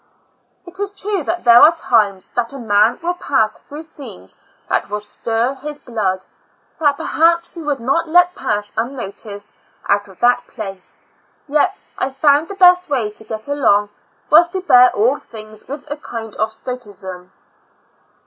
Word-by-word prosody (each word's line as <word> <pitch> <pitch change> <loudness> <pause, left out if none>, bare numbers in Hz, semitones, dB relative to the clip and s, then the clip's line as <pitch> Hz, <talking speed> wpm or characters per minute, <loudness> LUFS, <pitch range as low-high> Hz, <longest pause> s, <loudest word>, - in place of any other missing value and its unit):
It 360 +2 -6
is 400 -1 -4
true, 405 -2 -1
that 345 +1 -2
there 235 0 +8
are 325 +3 +7
times 205 - +1
that 240 +2 -1
a - - -7
man 215 -1 +2
will 350 +1 0
pass 220 -11 0
through 295 +2 -9
scenes 180 - -8 0.3
that - - -1
will 210 +1 -2
stir 225 +4 -2
his 290 +2 -7
blood, 200 -8 -2 0.5
that 290 -3 +2
perhaps 335 +3 +1
he 335 - -8
would 290 -3 -2
not 275 +8 0
let 355 +2 +5
pass 205 -7 -2
unnoticed 215 -3 -5 0.3
out 205 0 +1
of 190 -2 -17
that 245 0 +3
place; 195 -5 -8 0.4
yet, 295 0 +1 0.2
I 260 - 0
found 285 +3 +3
the 400 - -7
best 360 -2 +5
way 240 -7 0
to 215 - -9
get 220 +1 -6
along, 210 -8 +2 0.4
was 330 +3 +7
to 375 +2 -4
bear 250 -8 +6
all 240 +7 +2
things 215 -1 -12
with 285 +1 -7
a 295 - -2
kind 225 -7 -7
of 220 0 0
stoicism. 200 -7 -8
245 Hz, 165 wpm, -18 LUFS, 210-305 Hz, 0.5 s, there